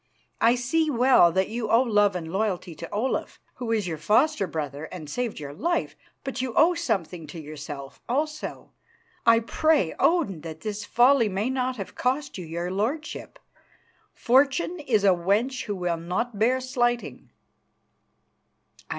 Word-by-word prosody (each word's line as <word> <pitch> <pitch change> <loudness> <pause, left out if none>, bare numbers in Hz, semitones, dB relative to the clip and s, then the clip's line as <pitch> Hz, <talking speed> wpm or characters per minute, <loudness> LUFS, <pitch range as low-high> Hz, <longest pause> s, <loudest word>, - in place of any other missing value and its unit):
I 235 +2 +5
see 305 +6 +1
well 250 - +5
that 190 +2 +1
you 225 -1 -3
owe 230 +3 +5
love 205 -5 +3
and 165 -2 -5
loyalty 190 -4 -1
to - - -8
Olaf, 230 +6 -2 0.2
who 240 -3 -3
is 215 -3 +1
your 160 -3 -4
foster 225 - +2
brother 150 -2 -4
and 160 -2 -9
saved 240 +6 -3
your 145 -1 -7
life, 340 - -1 0.3
but 270 -2 -4
you 255 -3 -4
owe 335 +3 +5
something 180 - -2
to 165 - -8
yourself 145 -2 -8
also. 300 +4 -3 0.6
I 230 0 +6
pray 300 - +2
Odin 295 - +2
that 160 -1 -8
this 210 -1 -4
folly 245 0 +4
may 205 +6 -1
not 255 -1 -1
have 195 - -6
cost 275 +3 -1
you 180 - -6
your 170 +2 -3
lordship. 250 +12 -3 0.8
Fortune 275 +7 +2
is 235 -9 +1
a 200 - +6
wench 205 +9 +1
who 205 - -3
will 175 -2 -1
not 185 +7 -3
bear 250 +4 +3
slighting." 240 -2 -1
225 Hz, 155 wpm, -25 LUFS, 180-260 Hz, 0.8 s, I